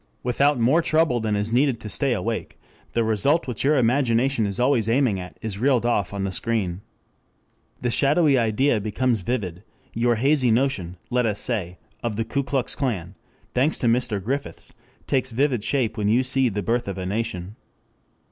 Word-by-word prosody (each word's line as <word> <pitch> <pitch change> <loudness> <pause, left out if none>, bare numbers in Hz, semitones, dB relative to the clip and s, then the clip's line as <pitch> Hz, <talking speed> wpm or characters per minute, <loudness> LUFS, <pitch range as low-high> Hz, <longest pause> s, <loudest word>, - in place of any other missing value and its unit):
Without 140 +3 +2
more 130 +9 +4
trouble 155 -6 +2
than 110 -2 -1
is 105 +2 -1
needed 130 -1 +2
to - - -8
stay 135 +5 0
awake 115 -1 -3 0.4
the 115 - +2
result 125 +7 +1
which 125 -4 -3
your 145 +2 +3
imagination 125 -1 +2
is 100 +2 -4
always 125 -3 +2
aiming 120 -5 +2
at 90 0 -9
is 105 -3 -4
reeled 125 -1 +2
off 100 -7 0
on 100 -1 -3
the 95 - -2
screen. 100 -4 -2 1.0
The 120 - 0
shadowy 145 +3 +3
idea 115 0 +2
becomes 110 +2 0
vivid; 90 -5 -3 0.3
your 120 +1 +2
hazy 135 +2 +2
notion, 110 -8 0
let 125 -1 +2
us 105 -1 -2
say, 95 -8 -2 0.2
of 115 -3 -2
the 115 +1 -2
Ku 140 +5 -1
Klux 135 -2 -2
Klan, 100 - -2 0.4
thanks 135 +5 +2
to - - -3
Mr. 115 -3 +1
Griffiths, 135 +9 -4 0.3
takes 130 -1 0
vivid 125 -2 0
shape 115 -5 0
when 105 -1 0
you 120 +5 +3
see 130 0 +2
the 105 -1 -3
Birth 120 +3 0
of 100 -1 -4
a 95 - -4
Nation. 100 -1 -3
120 Hz, 180 wpm, -23 LUFS, 105-130 Hz, 1.0 s, more